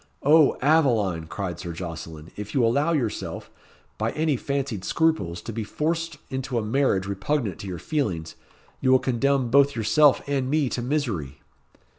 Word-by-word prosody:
"O 150 +1 +5
Aveline!" 115 - +2
cried 95 -1 -4
Sir 85 -2 -5
Jocelyn. 80 -2 -7
"If 105 +4 -7
you 125 -4 +4
allow 140 +8 +2
yourself, 130 -10 -3 0.5
by 110 +1 0
any 155 -2 +1
fancied 135 -6 -3
scruples, 95 - 0
to 115 - -6
be 110 0 -3
forced 165 +6 -2
into 130 -1 -3
a 115 - 0
marriage 110 -5 +1
repugnant 100 +3 -2
to 100 - -7
your 90 -2 -4
feelings, 90 - -2 0.5
you 130 - +1
will 130 - +7
condemn 130 0 0
both 140 +1 +5
yourself 140 +6 +4
and 135 -2 -1
me 150 -2 +1
to 120 - -3
misery." 115 - -2
125 Hz, 160 wpm, -25 LUFS, 95-145 Hz, 0.5 s, will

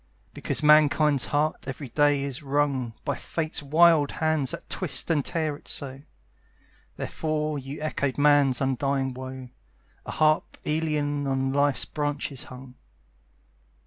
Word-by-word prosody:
Because - - -2
Mankind's 150 -2 +4
heart 150 +2 -1
every 135 0 -6
day 145 +1 +2
is 140 +1 -4
wrung 135 -4 -1
By - - 0
Fate's 160 -2 -4
wild 155 +1 +4
hands 155 -4 0
that - - -6
twist 155 -3 +1
and 150 -3 +2
tear 160 -3 -1
it - - -17
so, 135 -1 -3 1.0
Therefore 155 -1 -2
you 135 +2 -8
echoed 140 -3 -2
Man's 145 -3 +4
undying 135 0 0
woe, 130 0 -8 0.6
A - - -4
harp 155 0 +1
Aeolian 150 -2 -1
on 135 0 0
Life's 140 -1 +2
branches 145 -3 -3
hung. 125 0 -11
145 Hz, 130 wpm, -26 LUFS, 135-155 Hz, 1.0 s, Mankind's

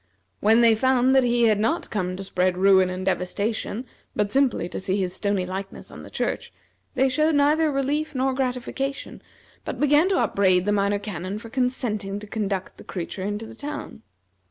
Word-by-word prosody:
When 225 +3 +4
they 230 -1 +6
found 260 +2 +3
that 265 -1 +5
he 240 -1 +2
had 215 -3 +4
not 310 +11 -1
come 185 -4 -2
to 195 - -5
spread 185 -1 0
ruin 190 -1 +5
and 185 +1 -4
devastation, 205 +5 -2 0.3
but 205 -1 0
simply 265 -10 +2
to - - -5
see 190 +1 -1
his 185 -2 -1
stony 200 -2 -1
likeness 190 +1 -6
on - - -10
the - - -11
church, - - -3 0.4
they 265 +1 +3
showed 305 +4 +2
neither 300 +2 +3
relief 290 +2 -1
nor 260 +1 +1
gratification, 265 +1 -3 0.4
but - - -5
began 295 +5 +4
to 385 - +2
upbraid 185 - +2
the 205 - +1
Minor 200 0 +2
Canon 195 -1 -5
for 230 +1 -9
consenting 240 -6 -1
to 210 - -8
conduct 205 -3 -3
the - - -12
creature 185 +1 -6
into 205 +3 -3
the - - -10
town. 295 +1 -7
215 Hz, 185 wpm, -24 LUFS, 195-265 Hz, 0.4 s, they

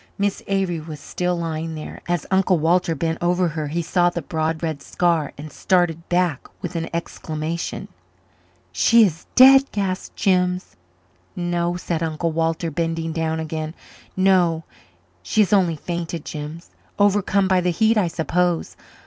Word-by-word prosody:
Miss 200 0 -1
Avery 190 -4 0
was 155 -1 -8
still 180 +4 -2
lying 165 -1 -3
there. 155 - -8
As 175 -3 -1
Uncle 190 -1 +3
Walter 165 +1 +2
bent 165 +2 -2
over 175 0 +2
her 155 -1 -4
he 170 +4 -2
saw 175 +1 +2
the 170 -2 -5
broad 160 +2 -2
red 155 -4 -2
scar 170 -3 0
and 150 +1 -8
started 175 -3 0
back 175 -5 0
with 180 0 -6
an 165 0 -2
exclamation. 165 -1 -4 0.8
"She 230 0 +5
is 165 -4 -4
dead?" 270 +1 +8
gasped 190 -2 -3
Jims. 180 -1 +1 0.6
"No," 175 0 -1
said 170 -2 -3
Uncle 165 +1 -1
Walter, 165 +1 -1
bending 165 +1 -2
down 160 0 -1
again 155 0 -4 0.4
"no, 180 -4 +3 0.6
she 215 - +1
has 210 0 +2
only 180 -5 +3
fainted, 170 0 -5
Jims 155 +3 -7 0.3
overcome 200 -1 +3
by 185 -1 +3
the 180 - +1
heat, 220 +6 +3
I 205 -5 +2
suppose. 175 +1 -1
170 Hz, 150 wpm, -22 LUFS, 160-180 Hz, 0.8 s, dead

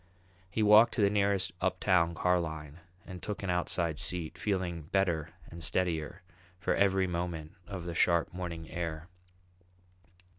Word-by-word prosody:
He 110 +4 0
walked 105 +2 +7
to 115 - +1
the 100 -1 +4
nearest 100 -2 +1
uptown 90 -2 +2
car 90 +1 +2
line 80 -2 -6 0.3
and 90 -1 -8
took 105 -1 -5
an 95 - 0
outside 85 -2 -1
seat, 85 -3 -2
feeling 90 -2 -2
better 80 -1 0 0.2
and 85 0 -8
steadier 90 0 -1 0.4
for - - +1
every 95 -1 +3
moment 85 -3 -3 0.2
of 95 -4 -6
the 85 - -4
sharp 85 0 +2
morning 85 -3 -5
air. 85 0 -4
90 Hz, 145 wpm, -31 LUFS, 85-95 Hz, 0.4 s, walked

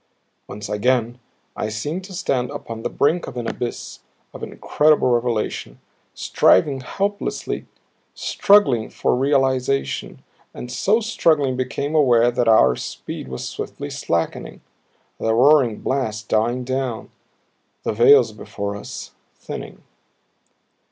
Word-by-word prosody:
Once 105 - -7
again 120 +3 0 0.4
I 105 - -3
seemed 145 - -4
to 190 - -11
stand 125 -8 -1
upon 115 -1 -7
the - - -2
brink 160 +5 +1
of 125 - -8
an 120 - -3
abyss 120 - -5 0.3
of - - -10
incredible 150 -3 +2
revelation, 115 - -1 0.4
striving 135 +8 +3
helplessly, 200 +9 -3 0.5
struggling 140 - +3
for - - 0
realization 135 0 0 0.3
and 125 - -7
so 205 - +2
struggling 155 - +2
became 130 +3 -3
aware 120 -6 +4
that 120 -1 0
our 65 - +5
speed - - -7
was 65 0 -5
swiftly - - -6
slackening, 85 -1 -3 0.6
the 110 0 +1
roaring 130 -3 +4
blast 110 -6 -2
dying 120 +3 +1
down, 130 -3 -3 0.7
the - - -1
veils 120 +1 +6
before 100 -1 -5
us 100 - -8 0.2
thinning. - - -8
125 Hz, 120 wpm, -21 LUFS, 110-140 Hz, 0.7 s, veils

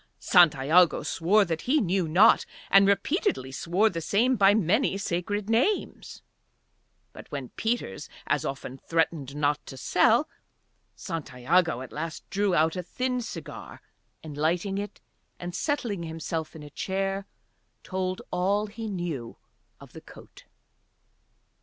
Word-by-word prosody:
Santiago 170 0 +4
swore 200 +5 +2
that 165 -3 -3
he 305 +3 +4
knew 185 - 0
not, 165 +5 +5 0.3
and 195 0 +7
repeatedly 200 - 0
swore 175 +10 +1
the 170 -6 -3
same 235 +10 +2
by 195 -3 +5
many 215 - +2
sacred 200 +2 -2
names; 245 - -1 0.9
but - - -12
when 135 -4 -5
Peters 225 - -3 0.2
as - - 0
often 135 -1 -5
threatened 160 -4 -1
not 150 0 0
to 135 - -9
sell, - - +3 0.7
Santiago 150 -1 0
at 130 - -9
last 160 +1 -6
drew 200 -2 +1
out 160 +1 +2
a 180 - -2
thin 250 +7 -2
cigar 225 - -8 0.4
and, 155 -2 -8
lighting 175 +6 0
it 205 0 -6 0.4
and 175 0 -6
settling 240 - -2
himself 160 -1 -5
in 155 - -9
a 145 - -11
chair, 195 +2 -2 0.6
told 185 0 -3
all 200 +4 +1
he 220 +2 -7
knew 170 - -5 0.4
of - - -15
the - - -10
coat. - - -15
180 Hz, 135 wpm, -27 LUFS, 155-205 Hz, 0.9 s, and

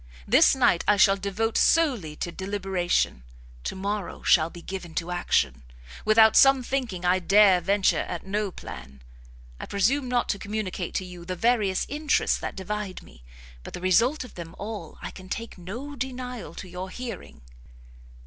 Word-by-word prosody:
This - - +6
night 245 -9 +3
I 210 - +4
shall 195 0 +6
devote 200 +3 -1
solely 250 - +2
to 175 - -4
deliberation; 190 - -1 0.4
to - - -4
morrow 200 +1 -4
shall 160 -2 +4
be 170 0 -12
given 185 -4 -7
to 170 +1 -2
action. 70 - 0 0.4
Without 220 0 +6
some 270 -1 +6
thinking 240 -9 -3
I 180 +1 +3
dare 195 0 +5
venture 195 +2 +2
at - - -5
no 205 +1 -1
plan; 70 - -10 0.6
I - - -7
presume 245 +7 +1
not 245 -1 +1
to 200 - -1
communicate 200 -4 -4
to 185 - -1
you 180 -1 -10
the 185 +1 -4
various 210 -2 +1
interests 295 0 +1
that - - -5
divide 200 0 -5
me, - - -17 0.4
but - - -9
the - - -6
result 230 - +2
of 250 - -12
them 170 -2 -9
all 215 0 -7
I - - -5
can 185 -1 -12
take 230 -1 -5
no 240 +11 -7
denial 250 -2 -6
to 185 - -8
your 180 +1 -6
hearing." 245 - -8
200 Hz, 170 wpm, -26 LUFS, 180-230 Hz, 0.6 s, This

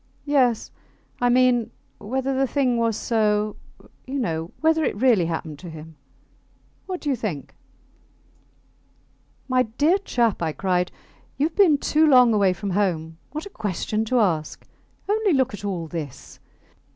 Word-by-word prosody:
Yes... 260 -6 +2 0.5
I 245 - +2
mean, 245 -2 +3 0.3
whether 265 +5 -2
the 270 0 +1
thing 255 -2 +1
was 230 -2 +1
so, 215 -2 0 0.5
you 270 +2 -3
know... 165 -9 -2
whether 320 0 +2
it - - 0
really 215 -6 +3
happened 160 -3 -5
to 175 - -9
him.... 160 0 -11 0.9
What 370 -2 -4
do 295 - -2
you - - +1
think? 200 - -5 1.9
My 255 -1 +3
dear 290 - +1
chap, 235 - 0
I 160 -2 -1
cried, 180 -1 0 0.5
you 285 - +2
have 320 - -3
been 350 -8 +5
too 310 +2 +2
long 250 -5 +6
away 200 -3 +3
from 190 +2 -4
home. 165 -5 -1
What 310 +1 -5
a 405 - -10
question 215 - -2
to 250 +2 +1
ask! 165 -8 -1 0.4
Only 420 -2 +2
look 260 -4 +1
at 205 - -8
all 185 -5 -3
this. 155 -5 -8
230 Hz, 150 wpm, -23 LUFS, 180-270 Hz, 1.9 s, long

